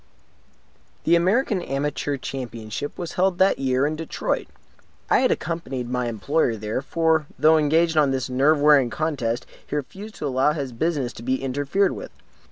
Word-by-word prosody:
The 170 Hz, -, +4 dB
American 190 Hz, +3 st, +2 dB
Amateur 145 Hz, 0 st, -2 dB
Championship 120 Hz, -1 st, -6 dB
was 175 Hz, -2 st, -5 dB
held 185 Hz, 0 st, +1 dB
that 190 Hz, +1 st, +3 dB
year 130 Hz, 0 st, +1 dB
in 155 Hz, +1 st, -1 dB
Detroit. 160 Hz, 0 st, -3 dB, 0.6 s
I -, -, +6 dB
had -, -, +3 dB
accompanied 140 Hz, -7 st, -3 dB
my 125 Hz, -1 st, -1 dB
employer 120 Hz, +3 st, 0 dB
there; 110 Hz, +3 st, -3 dB
for, 160 Hz, +1 st, +1 dB
though 160 Hz, +1 st, +5 dB
engaged 160 Hz, +2 st, +2 dB
on 150 Hz, -2 st, +5 dB
this 130 Hz, -2 st, -1 dB
nerve 140 Hz, +4 st, +3 dB
wearing 145 Hz, -4 st, +5 dB
contest, 125 Hz, -3 st, -2 dB, 0.2 s
he -, -, -4 dB
refused 195 Hz, +10 st, -6 dB
to -, -, -5 dB
allow 135 Hz, +2 st, +2 dB
his 140 Hz, -4 st, -4 dB
business 135 Hz, -1 st, -1 dB
to -, -, -10 dB
be 130 Hz, +3 st, -1 dB
interfered 145 Hz, +9 st, +1 dB
with. -, -, -7 dB
145 Hz, 165 wpm, -23 LUFS, 130-165 Hz, 0.6 s, I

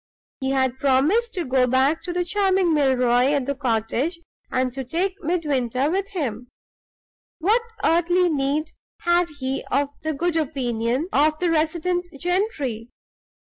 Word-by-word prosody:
He 265 Hz, -, -2 dB
had 260 Hz, -1 st, 0 dB
promised 315 Hz, -, +2 dB
to 355 Hz, -, -1 dB
go 255 Hz, -1 st, +2 dB
back 265 Hz, +5 st, +2 dB
to 360 Hz, -, -5 dB
the 355 Hz, 0 st, -1 dB
charming 380 Hz, -2 st, +2 dB
Milroy 255 Hz, -2 st, +3 dB
at 280 Hz, -3 st, 0 dB
the 280 Hz, -, -1 dB
cottage 255 Hz, +5 st, -1 dB, 0.3 s
and 255 Hz, -1 st, 0 dB
to 265 Hz, +1 st, -4 dB
take 350 Hz, +9 st, -1 dB
Midwinter 290 Hz, -5 st, 0 dB
with 390 Hz, +2 st, -1 dB
him. 250 Hz, -, -3 dB, 0.9 s
What 420 Hz, +8 st, +2 dB, 0.2 s
earthly 350 Hz, +2 st, +3 dB
need 300 Hz, 0 st, -1 dB, 0.3 s
had 345 Hz, 0 st, +2 dB
he 270 Hz, -3 st, -4 dB
of 280 Hz, 0 st, +1 dB
the 315 Hz, 0 st, -2 dB
good 335 Hz, +3 st, 0 dB
opinion 255 Hz, -2 st, -1 dB
of 305 Hz, +2 st, +3 dB
the 350 Hz, 0 st, 0 dB
resident 340 Hz, +3 st, 0 dB
gentry? 320 Hz, -, -1 dB
300 Hz, 140 wpm, -23 LUFS, 260-350 Hz, 0.9 s, Milroy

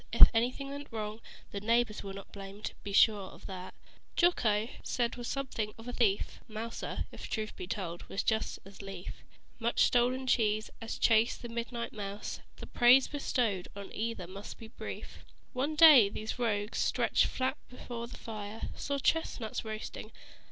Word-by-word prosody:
If -, -, +10 dB
anything 250 Hz, +4 st, 0 dB
went 285 Hz, 0 st, -6 dB
wrong, 215 Hz, 0 st, -4 dB, 0.3 s
The 200 Hz, -, -4 dB
neighbors 230 Hz, 0 st, +2 dB
where 195 Hz, -, -5 dB
not 195 Hz, -, -10 dB
blamed. 200 Hz, +1 st, -7 dB
Be 205 Hz, -, -6 dB
sure 200 Hz, -1 st, +5 dB
of -, -, -14 dB
that. 185 Hz, -1 st, -7 dB, 0.4 s
Jocko, 225 Hz, -, +3 dB
'tis -, -, -11 dB
said 240 Hz, -1 st, +1 dB
was 240 Hz, -1 st, -5 dB
something 230 Hz, -6 st, -3 dB
of 225 Hz, +2 st, -11 dB
a 245 Hz, -, -4 dB
thief; 210 Hz, -5 st, +1 dB
Mouser, 225 Hz, +1 st, -4 dB
if -, -, -8 dB
truth 215 Hz, -1 st, -3 dB
be 180 Hz, -, -6 dB
told, 180 Hz, -4 st, -4 dB
would 195 Hz, -, -2 dB
just 220 Hz, 0 st, +1 dB
as 195 Hz, +1 st, -11 dB
lief 195 Hz, -2 st, -8 dB, 0.4 s
Much 235 Hz, 0 st, +1 dB
stolen 250 Hz, +2 st, +3 dB
cheese 215 Hz, -3 st, +2 dB
as 225 Hz, -, -4 dB
chase 225 Hz, +1 st, +4 dB
the 240 Hz, -, -8 dB
midnight 235 Hz, 0 st, -4 dB
mouse. 205 Hz, -1 st, -5 dB, 0.2 s
The -, -, -9 dB
praise 250 Hz, +2 st, +6 dB
bestowed 235 Hz, -9 st, 0 dB
on 200 Hz, -1 st, -8 dB
either 225 Hz, -4 st, -3 dB
must 195 Hz, +3 st, -8 dB
be 225 Hz, -, -10 dB
brief. -, -, -8 dB, 0.3 s
One 280 Hz, +5 st, -1 dB
day 300 Hz, -10 st, +9 dB
these 215 Hz, +4 st, -5 dB
rogues, 210 Hz, -3 st, 0 dB
stretched -, -, +3 dB
flat 260 Hz, +2 st, -1 dB
before 240 Hz, -1 st, -6 dB
the 245 Hz, -, -10 dB
fire, 215 Hz, -1 st, -6 dB
Saw 280 Hz, -1 st, -2 dB
chestnuts 275 Hz, -6 st, 0 dB
roassting. 215 Hz, 0 st, -6 dB
225 Hz, 170 wpm, -32 LUFS, 205-245 Hz, 0.4 s, If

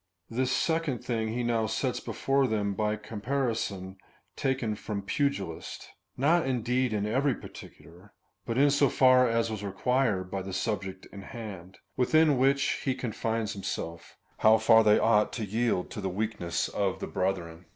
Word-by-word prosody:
This 130 Hz, +2 st, 0 dB
second 160 Hz, -4 st, 0 dB
thing 115 Hz, -3 st, -1 dB
he 120 Hz, +3 st, -2 dB
now 115 Hz, -2 st, +1 dB
sets 120 Hz, +4 st, -1 dB
before 135 Hz, 0 st, 0 dB
them 105 Hz, -3 st, 0 dB
by 105 Hz, +1 st, 0 dB
a -, -, -4 dB
comparison 110 Hz, -4 st, -3 dB, 0.4 s
taken 130 Hz, -5 st, -1 dB
from 105 Hz, -1 st, -5 dB
pugilists; 100 Hz, -, -3 dB, 0.3 s
not 155 Hz, +3 st, +3 dB
indeed 125 Hz, 0 st, 0 dB
in 105 Hz, -1 st, -1 dB
every 130 Hz, +5 st, +1 dB
par -, -, -10 dB
ticular,2 90 Hz, +4 st, -14 dB, 0.3 s
but 115 Hz, -, -3 dB
in 140 Hz, +1 st, +5 dB
so 140 Hz, -1 st, +3 dB
far 130 Hz, -1 st, +5 dB
as 115 Hz, 0 st, +1 dB
was 105 Hz, -2 st, -5 dB
required 100 Hz, -1 st, 0 dB
by 95 Hz, -, -2 dB
the 95 Hz, 0 st, -6 dB
subject 95 Hz, -3 st, -3 dB
in 100 Hz, -, -8 dB
hand, 95 Hz, -4 st, -9 dB, 0.2 s
Avithin 150 Hz, +1 st, +4 dB
which 140 Hz, +1 st, +2 dB
he 130 Hz, -2 st, 0 dB
confines 115 Hz, -2 st, -2 dB
himself 85 Hz, -4 st, -6 dB
— -, -, -37 dB
how 110 Hz, +1 st, +6 dB
far 110 Hz, +1 st, +6 dB
they 105 Hz, -1 st, +5 dB
ought 105 Hz, -2 st, +3 dB
to 110 Hz, -, -3 dB
yield 110 Hz, -2 st, -1 dB
to 105 Hz, -, -5 dB
the 95 Hz, -, -2 dB
weakness 100 Hz, -3 st, -2 dB
of 100 Hz, -2 st, -1 dB
the -, -, -3 dB
brethren. 90 Hz, -2 st, -3 dB
110 Hz, 170 wpm, -28 LUFS, 100-130 Hz, 0.4 s, how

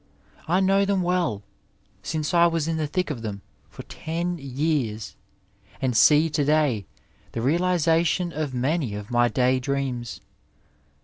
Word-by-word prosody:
I 180 Hz, +4 st, +2 dB
know 195 Hz, +1 st, +3 dB
them 195 Hz, -2 st, +1 dB
well, 175 Hz, -, 0 dB, 0.6 s
since 155 Hz, -, -3 dB
I 170 Hz, 0 st, +6 dB
was 165 Hz, -2 st, -1 dB
in 165 Hz, -1 st, -1 dB
the 155 Hz, -1 st, -1 dB
thick 180 Hz, +1 st, -2 dB
of 125 Hz, -6 st, -5 dB
them 100 Hz, -3 st, -6 dB, 0.3 s
for -, -, -10 dB
ten 170 Hz, +2 st, -4 dB
years, 130 Hz, -7 st, -2 dB, 0.6 s
and 130 Hz, -3 st, -1 dB
see 150 Hz, +7 st, +6 dB
to 155 Hz, -2 st, 0 dB
day, 140 Hz, -, +1 dB, 0.5 s
the 115 Hz, -, -3 dB
realization 170 Hz, +2 st, +1 dB
of 150 Hz, -2 st, -3 dB
many 130 Hz, -2 st, -1 dB
of 105 Hz, +1 st, -8 dB
my 120 Hz, 0 st, +3 dB
day 130 Hz, +1 st, +2 dB
dreams. 130 Hz, -3 st, -3 dB
150 Hz, 145 wpm, -24 LUFS, 125-170 Hz, 0.6 s, I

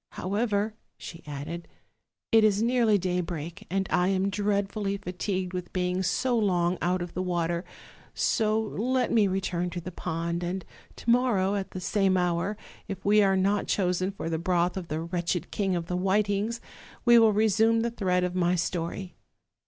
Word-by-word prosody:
However," 205 Hz, +2 st, -1 dB, 0.2 s
she 165 Hz, -1 st, -9 dB
added, 150 Hz, +4 st, -6 dB, 0.6 s
"it 225 Hz, -2 st, +6 dB
is 210 Hz, 0 st, +3 dB
nearly 235 Hz, -3 st, +3 dB
daybreak, 175 Hz, -3 st, -3 dB
and 190 Hz, 0 st, 0 dB
I 180 Hz, -, +3 dB
am 195 Hz, +1 st, +1 dB
dreadfully 200 Hz, 0 st, -1 dB
fatigued 185 Hz, -1 st, -3 dB
with 180 Hz, -1 st, -5 dB
being 180 Hz, 0 st, 0 dB
so 245 Hz, +7 st, +1 dB
long 180 Hz, -5 st, +1 dB
out 180 Hz, 0 st, +1 dB
of 175 Hz, -, -8 dB
the 185 Hz, -, -2 dB
water; 175 Hz, -1 st, -1 dB, 0.5 s
so 215 Hz, 0 st, +2 dB
let 240 Hz, +4 st, -1 dB
me 215 Hz, -3 st, +4 dB
return 185 Hz, -2 st, -1 dB
to 175 Hz, 0 st, -5 dB
the 180 Hz, +2 st, -7 dB
pond, 170 Hz, 0 st, -3 dB
and 180 Hz, +1 st, -3 dB, 0.3 s
to -, -, -5 dB
morrow, 230 Hz, -6 st, +3 dB
at 200 Hz, -2 st, -2 dB
the 185 Hz, -, -6 dB
same 190 Hz, 0 st, +2 dB
hour, 180 Hz, +3 st, 0 dB, 0.3 s
if 195 Hz, -2 st, -6 dB
we 210 Hz, +1 st, +5 dB
are 195 Hz, -1 st, +3 dB
not 200 Hz, +2 st, +1 dB
chosen 185 Hz, -1 st, +1 dB
for 195 Hz, -, -6 dB
the 165 Hz, -1 st, -1 dB
broth 175 Hz, 0 st, +1 dB
of 185 Hz, -3 st, -5 dB
the 155 Hz, 0 st, -3 dB
wretched 175 Hz, +1 st, -2 dB
King 195 Hz, -3 st, 0 dB
of 170 Hz, -1 st, -2 dB
the 180 Hz, -, -3 dB
Whitings, 205 Hz, +4 st, 0 dB, 0.4 s
we 240 Hz, -1 st, +8 dB
will 225 Hz, -1 st, +6 dB
resume 220 Hz, +2 st, +3 dB
the 235 Hz, +1 st, -1 dB
thread 180 Hz, -5 st, 0 dB
of 180 Hz, 0 st, -1 dB
my 180 Hz, -1 st, +2 dB
etory. 175 Hz, +1 st, -3 dB
190 Hz, 175 wpm, -27 LUFS, 175-210 Hz, 0.6 s, we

